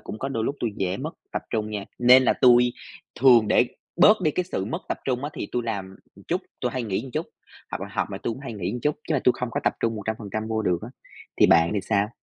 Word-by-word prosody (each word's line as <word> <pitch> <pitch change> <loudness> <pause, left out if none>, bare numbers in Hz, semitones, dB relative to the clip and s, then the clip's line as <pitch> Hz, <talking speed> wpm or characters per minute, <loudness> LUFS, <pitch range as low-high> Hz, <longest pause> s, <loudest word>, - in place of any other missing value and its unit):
cũng 105 - -8
có 135 - -3
đôi 115 -5 -2
lúc 140 - -2
tôi 120 - 0
dễ 95 0 -1
mất - - -5 0.2
tập - - -2
trung 110 -1 -2
nha, 105 -2 -4
nên 125 +1 +7
là - - +4
tui 125 -1 +5 0.5
thường 120 -5 +6
để 125 - +4 0.3
bớt 210 +4 +6
đi 155 - +3
cái 180 +4 -1
sự 135 - -3
mất 105 - -3
tập - - -2
trung 130 0 -1
á 145 - -3
thì - - -4
tui 120 - 0
làm 95 -4 -4 0.2
một - - -15
chút, - - 0 0.2
tôi - - -1
hay 130 - -2
nghỉ 100 -5 -2
một 135 - -9
chút, 155 +5 -2 0.4
hoặc - - -4
là 100 - -6
học 105 - -1
mà 95 - -5
tôi 115 - -1
cũng 130 - -11
hay 135 -4 -6
nghỉ 95 -3 -3
một 120 +3 -4
chút, 150 +4 0
chứ 160 - +1
mà 135 - +1
tui 125 - +6
không 125 -2 -2
có - - -2
tập - - +3
trung 115 -1 0
100% 110 0 -4
vô 110 -1 -1
được 90 -4 +1
á, 110 - -6 0.5
thì - - +6
bạn 85 0 +5
thì 100 - +1
sao? 100 +1 +1
115 Hz, 285 wpm, -25 LUFS, 105-130 Hz, 0.5 s, nên